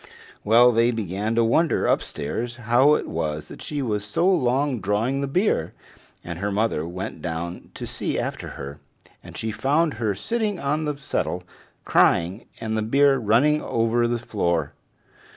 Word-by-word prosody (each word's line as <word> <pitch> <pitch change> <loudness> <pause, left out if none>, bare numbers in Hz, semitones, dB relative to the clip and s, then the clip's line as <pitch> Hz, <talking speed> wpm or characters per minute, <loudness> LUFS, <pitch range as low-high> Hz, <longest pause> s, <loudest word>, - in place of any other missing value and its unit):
Well, 120 +3 +6
they 115 +1 +3
began 105 -1 -2
to 115 - +4
wonder 160 +9 +2
upstairs 120 +12 -1
how 125 +5 +4
it - - -3
was 75 -2 -3
that - - -10
she 145 -2 -3
was 105 -4 -1
so 105 - 0
long 135 -6 +2
drawing 105 +8 0
the 140 - -1
beer, 140 - 0 0.5
and 85 -1 -6
her 100 +2 -1
mother 100 -6 0
went 90 +2 -6
down 85 +1 -5
to - - -5
see - - -3
after - - -3
her, 70 +1 -7 0.4
and - - -10
she 110 - -2
found 145 +8 +1
her 105 -3 0
sitting 215 - -2
on 150 +3 -1
the 150 -1 -2
settle 90 -9 -2 0.4
crying, 90 +6 +2
and 110 0 -3
the 110 - 0
beer 135 +5 +4
running 130 +7 +3
over 115 +1 +1
the 120 0 0
floor. 85 -10 -1
115 Hz, 165 wpm, -24 LUFS, 100-140 Hz, 0.5 s, Well